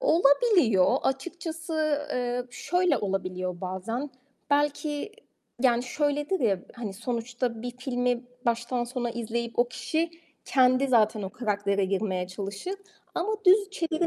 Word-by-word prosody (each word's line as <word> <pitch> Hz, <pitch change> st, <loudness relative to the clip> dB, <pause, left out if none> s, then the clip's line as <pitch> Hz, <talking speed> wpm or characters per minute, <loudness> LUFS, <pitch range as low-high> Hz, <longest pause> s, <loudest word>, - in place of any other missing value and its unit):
olabiliyor. 300 Hz, -, +4 dB
Açıkçası, 315 Hz, +1 st, -1 dB
eee, 245 Hz, 0 st, -1 dB
şöyle 330 Hz, +4 st, +1 dB
olabiliyor 185 Hz, -3 st, -2 dB
bazen. 210 Hz, +9 st, -3 dB, 0.4 s
Belki, 295 Hz, +5 st, 0 dB, 0.5 s
yani, 240 Hz, -2 st, +4 dB
şöyledir 295 Hz, +6 st, 0 dB
ya, 200 Hz, -7 st, +2 dB
hani, 230 Hz, -5 st, -5 dB
sonuçta 235 Hz, +2 st, -3 dB
bir 245 Hz, -, -3 dB
filmi 245 Hz, -1 st, 0 dB, 0.2 s
baştan 235 Hz, +1 st, 0 dB
sona 240 Hz, 0 st, -3 dB
izleyip 235 Hz, 0 st, -3 dB
o 240 Hz, -, +6 dB
kişi 320 Hz, +6 st, -1 dB, 0.3 s
kendi 255 Hz, 0 st, +4 dB
zaten 220 Hz, -4 st, +3 dB
o 190 Hz, -, -4 dB
karaktere 200 Hz, -3 st, 0 dB
girmeye 190 Hz, -1 st, -1 dB
çalışır 200 Hz, -, -5 dB, 0.4 s
ama 425 Hz, +5 st, 0 dB
düz 395 Hz, +2 st, +6 dB
çeviri 335 Hz, -2 st, 0 dB
245 Hz, 120 wpm, -27 LUFS, 215-295 Hz, 0.5 s, o